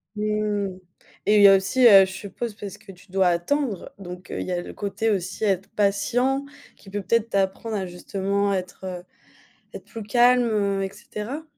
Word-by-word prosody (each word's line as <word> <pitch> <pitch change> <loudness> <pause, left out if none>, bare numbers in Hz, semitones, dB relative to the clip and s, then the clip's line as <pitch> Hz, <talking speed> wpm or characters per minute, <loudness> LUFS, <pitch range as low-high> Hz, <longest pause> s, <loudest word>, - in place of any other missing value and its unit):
Mmh. 210 -2 -1 0.5
Et 210 - +4
il - - +6
y 200 - +10
a 195 - +8
aussi, 195 +7 +2
heu, 195 -3 +9
je 190 - -8
suppose, 205 +4 -6
parce 205 -3 -8
que 215 -1 -13
tu 180 +1 -19
dois 190 -1 +3
attendre. 200 +6 -1
Donc 180 -1 -9
heu, - - -4
il - - -4
y 185 - -3
a 175 - -1
le - - -9
côté 205 +3 -2
aussi 190 0 -2
être 195 -2 0
patient 245 +7 +1 0.3
qui 195 - -16
peut 205 +1 -3
peut-être 230 +4 +1
t'apprendre 195 +3 -1
à 195 -2 -2
justement 195 +3 -2
être 185 -1 -5 0.7
être - - -9
plus 225 - -8
calme, 245 +3 +4
heu 200 -3 0
et 190 - -4
cetera? 235 +9 -7
200 Hz, 190 wpm, -24 LUFS, 190-215 Hz, 0.7 s, y